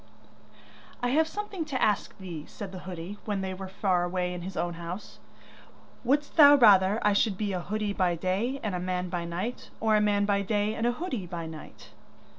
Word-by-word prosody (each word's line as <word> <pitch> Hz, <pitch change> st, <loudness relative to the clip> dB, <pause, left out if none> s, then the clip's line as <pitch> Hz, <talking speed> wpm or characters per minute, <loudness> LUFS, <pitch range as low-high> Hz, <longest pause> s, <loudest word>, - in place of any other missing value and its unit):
'I 245 Hz, -, +2 dB
have 315 Hz, +5 st, +3 dB
something 410 Hz, -1 st, -4 dB
to 275 Hz, -4 st, -3 dB
ask 210 Hz, -4 st, +1 dB
thee,' 170 Hz, -5 st, -7 dB
said 200 Hz, -3 st, -8 dB
the 185 Hz, -, -7 dB
hoodie 180 Hz, +3 st, -7 dB
when 205 Hz, -2 st, -1 dB
they 190 Hz, 0 st, -3 dB
were 190 Hz, +1 st, -7 dB
far 190 Hz, -2 st, +1 dB
away 180 Hz, 0 st, -1 dB
in 180 Hz, -, -6 dB
his 185 Hz, +2 st, -7 dB
own 175 Hz, +1 st, -1 dB
house. 170 Hz, +4 st, -7 dB, 0.8 s
'Wouldst 285 Hz, +6 st, 0 dB
thou 290 Hz, -2 st, +10 dB
rather 205 Hz, -5 st, +6 dB
I 210 Hz, -, +4 dB
should 200 Hz, -1 st, +2 dB
be 205 Hz, -1 st, -2 dB
a 180 Hz, -, -2 dB
hoodie 210 Hz, +2 st, -2 dB
by 180 Hz, -3 st, +1 dB
day 195 Hz, +10 st, -1 dB
and 210 Hz, -3 st, -2 dB
a 180 Hz, -, -1 dB
man 180 Hz, 0 st, -2 dB
by 175 Hz, -1 st, -3 dB
night, 180 Hz, +9 st, -4 dB
or 220 Hz, -1 st, +3 dB
a 210 Hz, -, +4 dB
man 205 Hz, -1 st, +2 dB
by 200 Hz, -1 st, +2 dB
day 205 Hz, +1 st, 0 dB
and 225 Hz, +2 st, -1 dB
a -, -, +3 dB
hoodie 250 Hz, -, -4 dB
by 170 Hz, -1 st, -5 dB
night? 160 Hz, -1 st, -11 dB
200 Hz, 210 wpm, -28 LUFS, 180-220 Hz, 0.8 s, thou